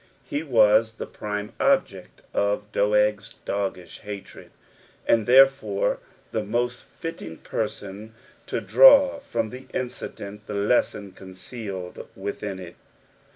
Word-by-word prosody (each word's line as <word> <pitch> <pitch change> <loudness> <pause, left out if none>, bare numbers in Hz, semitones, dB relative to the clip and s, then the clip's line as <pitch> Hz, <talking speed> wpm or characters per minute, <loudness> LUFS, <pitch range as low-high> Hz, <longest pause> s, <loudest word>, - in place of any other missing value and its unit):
}{e 145 - 0
vxu 110 -5 +4
the - - -4
prime 105 0 -5
ob)ed 265 - +1 0.3
of 105 0 0
Doeg's 105 -1 +1
doggish 95 -3 -3
hatred, 105 -2 -9 0.6
and 110 -2 +3
therefore 130 -6 +4 0.3
the 110 - -1
mostfiUiiuj 120 - -4
person 105 +3 -5 0.3
to - - -1
draafrom 130 - +5
the 130 +1 -10
incident 105 -4 -6
the - - -5
tenson 100 -1 +1
coneeoUd 95 -1 -8
idtlUn 100 0 -4
il. 90 -2 -9
105 Hz, 105 wpm, -25 LUFS, 100-120 Hz, 0.6 s, draafrom